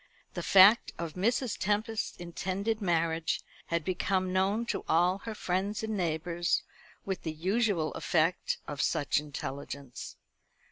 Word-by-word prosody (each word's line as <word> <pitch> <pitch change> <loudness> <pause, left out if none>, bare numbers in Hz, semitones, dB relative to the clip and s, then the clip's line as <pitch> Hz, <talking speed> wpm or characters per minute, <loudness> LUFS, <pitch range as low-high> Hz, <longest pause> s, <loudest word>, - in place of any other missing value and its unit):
The - - -3
fact 200 +4 +7
of 165 -2 -4
Mrs. 230 +5 0
Tempest's 215 +2 -1
intended 190 +5 -2
marriage 165 -3 +1 0.3
had 170 -2 -1
become 185 0 0
known 195 +5 +1
to - - -2
all 180 +4 +3
her 220 +2 -6
friends 195 +3 -1
and 220 -1 -2
neighbours, 170 -1 0 0.4
with 190 -1 -3
the 160 - -3
usual 185 0 0
effect 165 +2 +1
of 145 -1 -3
such 145 - +1
intelligence. 140 -2 -6
185 Hz, 130 wpm, -30 LUFS, 165-205 Hz, 0.4 s, fact